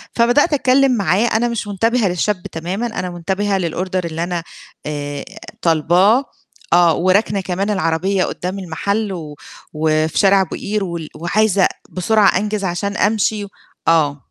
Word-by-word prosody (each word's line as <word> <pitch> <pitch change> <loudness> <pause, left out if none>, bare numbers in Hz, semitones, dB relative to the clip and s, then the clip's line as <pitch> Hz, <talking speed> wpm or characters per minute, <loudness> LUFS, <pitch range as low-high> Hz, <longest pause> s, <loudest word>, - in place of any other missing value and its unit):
فبدأت 245 +7 +3
أتكلّم 270 -1 +3
معاه 195 +2 +2
أنا 230 +1 +1
مش 235 -3 -3
منتبهة 225 +2 +1
للشاب 180 +2 -1
تمامًا 185 +8 -3
أنا 185 -5 -4
منتبهة 190 +3 -1
للOrder 185 +1 -2
اللي 165 0 -3
أنا 175 -1 -3 0.4
آآ 145 -1 -4 0.4
طالباه، 180 - +3 0.5
آه 175 -2 +5
وراكنة 195 +2 +2
كمان 190 +2 -2
العربية 190 0 0
قدّام 185 +2 -4
المحل 200 +4 -2
و 155 -4 -7 0.4
وفي 155 0 0
شارع 195 0 +5
أبو 185 - -3
قير 210 0 -2
وال 170 -4 -5
وعايزة 195 +4 +2 0.2
بسرعة 200 +1 +3
أنجز 210 0 -2
عشان 200 +3 -2
أمشي 210 0 +1 0.4
آه. 150 -3 +3
190 Hz, 140 wpm, -18 LUFS, 170-210 Hz, 0.5 s, آه